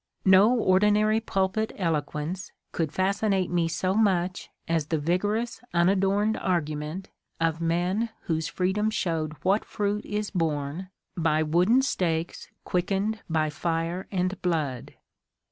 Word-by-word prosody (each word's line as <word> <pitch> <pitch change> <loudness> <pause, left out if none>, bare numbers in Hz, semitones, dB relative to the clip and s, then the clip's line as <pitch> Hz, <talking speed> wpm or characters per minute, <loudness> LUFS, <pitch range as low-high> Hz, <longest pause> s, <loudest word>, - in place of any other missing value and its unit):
No 190 +3 +7
ordi 190 0 +4
nary 215 +1 +3
pulpit 195 0 -1
eloquence 165 +1 -2 0.2
could 160 -4 -1
fascinate 195 +1 0
me 170 -2 +2
so 185 +3 -1
much 185 -4 +1 0.2
as 165 -3 0
the 160 - 0
vigorous 205 +9 -1
unadorned 195 +4 +2
argument 155 0 -2 0.3
of 165 0 0
men 180 +7 0
whose 160 -1 -1
freedom 190 +4 0
showed 165 -7 -1
what 195 +3 +2
fruit 210 0 -2
is 210 0 -3
borne 160 0 -2 0.3
by 160 -3 +2
wooden 180 +12 +3
stakes 170 -9 -1 0.2
quickened 195 +4 -1
by 155 -2 +1
fire 165 +3 -2
and 185 0 -1
blood. 155 -8 -2
180 Hz, 125 wpm, -26 LUFS, 165-200 Hz, 0.3 s, No